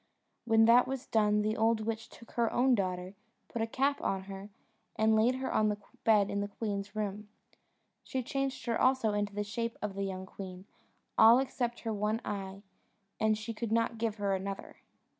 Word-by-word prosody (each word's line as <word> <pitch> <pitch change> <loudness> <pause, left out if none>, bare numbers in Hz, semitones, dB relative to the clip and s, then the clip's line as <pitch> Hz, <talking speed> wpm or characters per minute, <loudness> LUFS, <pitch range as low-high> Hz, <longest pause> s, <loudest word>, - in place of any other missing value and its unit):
When 225 -1 +5
that 240 +2 +6
was 270 0 -4
done 210 -1 +2
the 215 +1 0
old 225 0 +2
witch 225 +1 -3
took 230 - -15
her 235 -2 +1
own 255 +1 +3
daughter, 185 -3 -1 0.3
put 235 - -4
a 225 - 0
cap 275 +4 0
on 190 -1 -1
her, 195 +1 -8 0.5
and 220 0 +3
laid 230 +4 +4
her 260 0 -3
on 215 0 +3
the 210 - -1 0.3
bed 210 -3 +4
in 200 - -1
the 205 - -2
queen's 205 -1 -4
room. 210 0 -3 0.7
She 260 -1 -3
changed 275 +2 -2
her 235 -2 0
also 255 -5 +3
into 205 -1 -1
the 205 - -1
shape 230 +3 -3
of 210 -2 -3
the 200 - -4
young 190 -1 -3
queen, 185 -1 -9 0.5
all 225 +2 +9
except 245 -2 -2
her 225 -1 -2
one 210 +2 0
eye, 195 -1 -5 0.6
and 215 0 +3
she 220 +2 -5
could 225 0 -4
not 230 0 +1
give 225 -2 0
her 200 -2 0
another. 195 +1 -5
215 Hz, 195 wpm, -31 LUFS, 200-230 Hz, 0.7 s, all